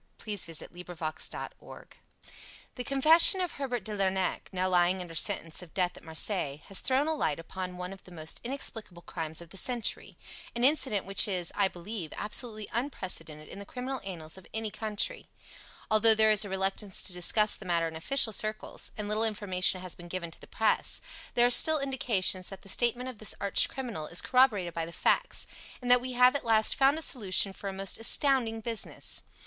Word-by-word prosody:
Tales 205 Hz, -4 st, -4 dB
of -, -, -2 dB
Mystery 175 Hz, -, -10 dB
The 175 Hz, -1 st, -10 dB
Lost 155 Hz, -2 st, -4 dB
Special -, -, -6 dB, 0.9 s
The 250 Hz, -, -6 dB
confession 315 Hz, +8 st, +6 dB
of 360 Hz, -2 st, -1 dB
Herbert 250 Hz, -6 st, -4 dB
de 210 Hz, +1 st, -5 dB
Lernac, 190 Hz, -1 st, -1 dB
now 185 Hz, -1 st, -1 dB
lying 180 Hz, 0 st, +2 dB
under 175 Hz, -2 st, -8 dB
sentence 165 Hz, -1 st, 0 dB
of 180 Hz, -1 st, -14 dB
death 180 Hz, -2 st, 0 dB
at -, -, -12 dB
Marseilles, 160 Hz, -3 st, -1 dB
has 195 Hz, -, -2 dB
thrown 265 Hz, +2 st, +1 dB
a 320 Hz, -, +1 dB
light 155 Hz, -, -1 dB
upon 180 Hz, +2 st, -7 dB
one 180 Hz, +1 st, -6 dB
of 195 Hz, -, -14 dB
the 185 Hz, -, -15 dB
most 160 Hz, -2 st, -1 dB
inexplicable 225 Hz, -8 st, -4 dB
crimes 160 Hz, 0 st, -4 dB
of 170 Hz, -1 st, -13 dB
the 195 Hz, -, -9 dB
century 240 Hz, +1 st, -2 dB, 0.4 s
an 235 Hz, -, -2 dB
incident 260 Hz, -7 st, +4 dB
which 195 Hz, +2 st, +3 dB
is, 180 Hz, -4 st, -2 dB
I 200 Hz, -2 st, +3 dB
believe, 180 Hz, -2 st, -7 dB
absolutely 215 Hz, 0 st, -1 dB
unprecedented 180 Hz, -, -4 dB
in -, -, -10 dB
the 200 Hz, -, -9 dB
criminal 260 Hz, +1 st, -5 dB
annals 175 Hz, -3 st, -7 dB
of 185 Hz, -, -18 dB
any 220 Hz, -1 st, -3 dB
country: 220 Hz, -, -2 dB, 0.6 s
Although 220 Hz, +1 st, +7 dB
there 220 Hz, 0 st, +5 dB
is 215 Hz, 0 st, +4 dB
a 200 Hz, -, -6 dB
reluctance 195 Hz, +1 st, -1 dB
to 185 Hz, -, -2 dB
discuss 210 Hz, +4 st, +3 dB
the 195 Hz, -, -11 dB
matter 170 Hz, -2 st, 0 dB
in 160 Hz, -, -8 dB
official 220 Hz, +7 st, +2 dB
circles, 215 Hz, +1 st, -1 dB
and 210 Hz, -1 st, -4 dB
little 215 Hz, +1 st, 0 dB
information 195 Hz, -4 st, +1 dB
has 185 Hz, -1 st, -4 dB
been 175 Hz, -, -12 dB
given 170 Hz, -1 st, -5 dB
to -, -, -11 dB
the -, -, -13 dB
Press, -, -, +1 dB, 0.4 s
there 240 Hz, -, +5 dB
are 245 Hz, -, +3 dB
still 315 Hz, +5 st, +6 dB
indications 235 Hz, -9 st, 0 dB
that 195 Hz, -2 st, -10 dB
the 195 Hz, -, -9 dB
statement 240 Hz, +4 st, +1 dB
of 250 Hz, -5 st, -7 dB
this 215 Hz, -, -2 dB
arch 200 Hz, -1 st, +3 dB
criminal 230 Hz, -, -5 dB
is 175 Hz, -, -1 dB
corroborated 215 Hz, -10 st, +2 dB
by 165 Hz, -1 st, -3 dB
the -, -, -8 dB
facts, -, -, 0 dB, 0.3 s
and 245 Hz, -1 st, -1 dB
that 250 Hz, 0 st, +6 dB
we 255 Hz, 0 st, -5 dB
have 250 Hz, +2 st, +5 dB
at 285 Hz, -, -2 dB
last 220 Hz, -2 st, +3 dB
found 275 Hz, +2 st, +3 dB
a 320 Hz, -, -1 dB
solution 200 Hz, -7 st, +1 dB
for 200 Hz, -, -8 dB
a -, -, -4 dB
most 195 Hz, +2 st, -1 dB
astounding 230 Hz, -2 st, +2 dB
business. 230 Hz, -1 st, -3 dB
205 Hz, 205 wpm, -29 LUFS, 180-240 Hz, 0.9 s, Although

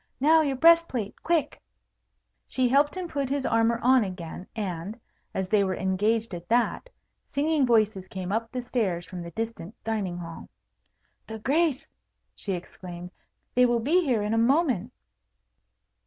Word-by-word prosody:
"Now, 315 Hz, +4 st, +5 dB
your 280 Hz, -3 st, 0 dB
breast 335 Hz, +4 st, +6 dB
plate, 220 Hz, -5 st, -4 dB
quick!" 325 Hz, -4 st, 0 dB, 0.9 s
She 255 Hz, -1 st, +1 dB
helped 285 Hz, +7 st, +3 dB
him 365 Hz, -1 st, -3 dB
put 280 Hz, -5 st, -2 dB
his 275 Hz, -1 st, -1 dB
armour 230 Hz, +1 st, +2 dB
on 255 Hz, -1 st, +5 dB
again; 180 Hz, -2 st, -7 dB
and, 195 Hz, +1 st, -4 dB, 0.3 s
as 190 Hz, -1 st, -2 dB
they 205 Hz, +1 st, +3 dB
were 190 Hz, -1 st, -1 dB
engaged 210 Hz, +4 st, 0 dB
at 175 Hz, 0 st, -8 dB
that, 240 Hz, -, +1 dB, 0.4 s
singing 295 Hz, -1 st, +1 dB
voices 215 Hz, -5 st, +2 dB
came 185 Hz, -1 st, -5 dB
up 225 Hz, +2 st, -1 dB
the 250 Hz, -1 st, -4 dB
stairs 200 Hz, -9 st, -1 dB
from 180 Hz, -1 st, -7 dB
the 170 Hz, -, -7 dB
distant 225 Hz, -2 st, -5 dB
dining 205 Hz, -6 st, -2 dB
hall. 165 Hz, -1 st, -8 dB, 0.8 s
"The 220 Hz, -, -6 dB
Grace," 285 Hz, +4 st, 0 dB, 0.4 s
she 195 Hz, -, -4 dB
exclaimed; 175 Hz, 0 st, -8 dB, 0.4 s
"they 250 Hz, 0 st, +5 dB
will 240 Hz, -1 st, +2 dB
be 325 Hz, +10 st, +2 dB
here 245 Hz, -8 st, +1 dB
in 210 Hz, +1 st, -1 dB
a 225 Hz, -, +2 dB
moment." 250 Hz, -, +2 dB
225 Hz, 155 wpm, -26 LUFS, 190-270 Hz, 0.9 s, breast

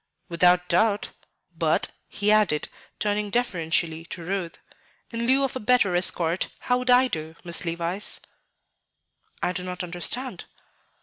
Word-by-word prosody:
"Without 180 Hz, +1 st, +4 dB
doubt. 205 Hz, +4 st, +2 dB, 0.4 s
But," -, -, +1 dB, 0.2 s
he 205 Hz, +1 st, 0 dB
added, 210 Hz, -8 st, +3 dB, 0.3 s
turning 210 Hz, 0 st, -1 dB
deferentially 170 Hz, -8 st, 0 dB
to 170 Hz, 0 st, -8 dB
Ruth, 185 Hz, -2 st, -3 dB, 0.5 s
"in 235 Hz, 0 st, -2 dB
lieu 270 Hz, +2 st, +4 dB
of 270 Hz, -, -1 dB
a -, -, -2 dB
better 210 Hz, -5 st, +3 dB
escort, 175 Hz, -1 st, +2 dB
how 250 Hz, 0 st, +1 dB
would 250 Hz, 0 st, -4 dB
I 250 Hz, +1 st, +6 dB
do, 160 Hz, -6 st, -5 dB
Miss 170 Hz, 0 st, 0 dB
Levice?" 170 Hz, +4 st, -2 dB, 1.2 s
"I -, -, +2 dB
do 180 Hz, 0 st, -4 dB
not 180 Hz, 0 st, -4 dB
understand." 180 Hz, +9 st, -2 dB
185 Hz, 135 wpm, -25 LUFS, 170-230 Hz, 1.2 s, I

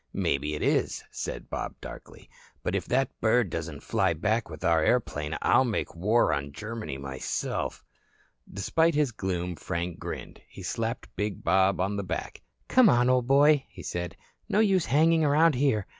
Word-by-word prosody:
"Maybe 75 Hz, +2 st, 0 dB
it -, -, -4 dB
is," -, -, +1 dB
said -, -, -5 dB
Bob -, -, -4 dB
darkly. -, -, -11 dB, 0.4 s
"But -, -, -1 dB
if -, -, -2 dB
that 135 Hz, +2 st, +1 dB
bird 110 Hz, -4 st, +3 dB
doesn't 80 Hz, -3 st, -5 dB
fly 95 Hz, -6 st, +1 dB
back 105 Hz, +7 st, -1 dB
with 80 Hz, -2 st, -9 dB
our 85 Hz, -1 st, +3 dB
airplane 80 Hz, -11 st, 0 dB
I'll -, -, +5 dB
make 120 Hz, -4 st, -2 dB
war 105 Hz, +8 st, +2 dB
on 70 Hz, 0 st, -3 dB
Germany 110 Hz, -5 st, -5 dB
myself." 65 Hz, -1 st, -3 dB, 0.7 s
Despite 160 Hz, -, +1 dB
his 145 Hz, -4 st, +2 dB
gloom, 90 Hz, -4 st, -3 dB
Frank 85 Hz, 0 st, -4 dB
grinned. -, -, -7 dB
He -, -, -11 dB
slapped 115 Hz, +1 st, -4 dB
big 105 Hz, -2 st, -3 dB
Bob 95 Hz, +2 st, +3 dB
on 100 Hz, +2 st, 0 dB
the 100 Hz, -, -2 dB
back. 90 Hz, -2 st, -5 dB, 0.3 s
"Come 255 Hz, -4 st, +6 dB
on, 120 Hz, +1 st, +4 dB
old 125 Hz, -1 st, +2 dB
boy," 140 Hz, +1 st, +5 dB
he -, -, -11 dB
said. 90 Hz, -1 st, -4 dB, 0.3 s
"No 205 Hz, -, +2 dB
use 195 Hz, -5 st, +3 dB
hanging 160 Hz, +5 st, +4 dB
around 155 Hz, +2 st, +4 dB
here. 125 Hz, -7 st, +1 dB
105 Hz, 170 wpm, -27 LUFS, 85-135 Hz, 0.7 s, Come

